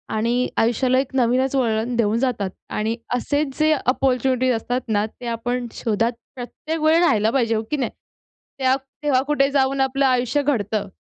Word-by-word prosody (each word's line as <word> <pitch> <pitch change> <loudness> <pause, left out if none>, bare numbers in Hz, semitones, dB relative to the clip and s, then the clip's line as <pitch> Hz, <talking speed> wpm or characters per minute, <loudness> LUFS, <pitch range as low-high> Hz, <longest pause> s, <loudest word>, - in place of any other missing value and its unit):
आणि 235 +3 +1
आयुष्याला 250 +3 +2
एक 265 0 -3
नवीनच 255 +2 +2
वळण 235 -1 0
देऊन 225 -1 +1
जातात. 235 -7 -1 0.2
आणि 220 +2 -1 0.2
असेच 285 +2 -1
जे 310 0 +4
अपॉर्च्युनिटीज 255 0 +1
असतात 245 +3 -2
ना 210 -1 +1
ते 240 +2 -10
आपण 240 +1 -2
शोधात 230 +2 0 0.2
प्रत्येक 305 +6 -5
वेळी 315 +2 +4
राहिला 220 -9 +3
पाहिजे, 230 -4 +1
हो 220 - -1
की 300 - +1
नाही? 255 -5 -2 0.7
त्या 260 0 +3 0.3
तेव्हा 275 -3 +2
कुठे 280 -2 +2
जाऊन 275 -1 +1
आपलं 270 +1 +2
आयुष्य 255 +2 +1
घडतं. 215 -7 -1
250 Hz, 165 wpm, -22 LUFS, 230-270 Hz, 0.7 s, जे